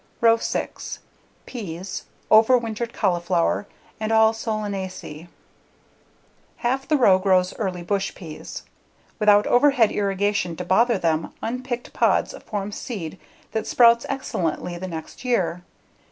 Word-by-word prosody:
Row 230 -1 +6
6: - - -4 0.5
Peas, 190 -6 -6 0.3
Overwintered 230 0 +4
Cauliflower, 175 -1 0 0.3
and 215 0 -2
All 220 0 +5
Solanaceae 195 -7 -5 1.4
Half 265 +3 0
the 305 - +3
row 195 -8 +5
grows 185 -1 +2
early 185 -5 -2
bush 195 +2 -1
peas. 160 -5 -8 0.6
Without 210 -1 +5
overhead 245 -3 +4
irrigation 200 -3 0
to 180 - -6
bother 230 +5 +3
them, 160 -3 -1
unpicked 245 +1 -4
pods - - +2
form 205 -1 -3
seed 195 -7 -6 0.3
that 220 0 -2
sprouts 235 -1 +5
excellently 180 - -2
the 185 +2 -5
next 165 +6 -8
year. 190 -8 0
205 Hz, 115 wpm, -23 LUFS, 180-230 Hz, 1.4 s, Row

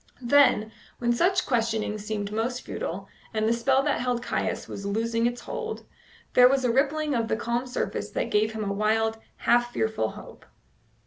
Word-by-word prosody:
Then, 240 -4 +4 0.3
when 240 0 +1
such 365 +8 +2
questioning 225 -3 0
seemed 205 -1 -4
most 240 +4 -2
futile, 195 +4 -5 0.3
and 215 0 +1
the 230 - +3
spell 265 +3 +2
that 290 -1 +1
held 245 -1 -1
Caius - - -2
was 200 - -7
loosing 230 +3 0
its 240 0 -4
hold, 455 -2 -5 0.5
there 250 0 +8
was 265 -1 +1
a 240 - +3
rippling 295 +4 +1
of 230 -3 0
the 220 - 0
calm 240 +2 -2
surface 250 - -3
that - - -3
gave 215 +1 +2
him 220 -1 -3
a 200 -1 -1
wild, 220 +2 +1 0.2
half 240 0 +2
fearful 220 - 0
hope. - - -12
235 Hz, 180 wpm, -26 LUFS, 220-255 Hz, 0.5 s, there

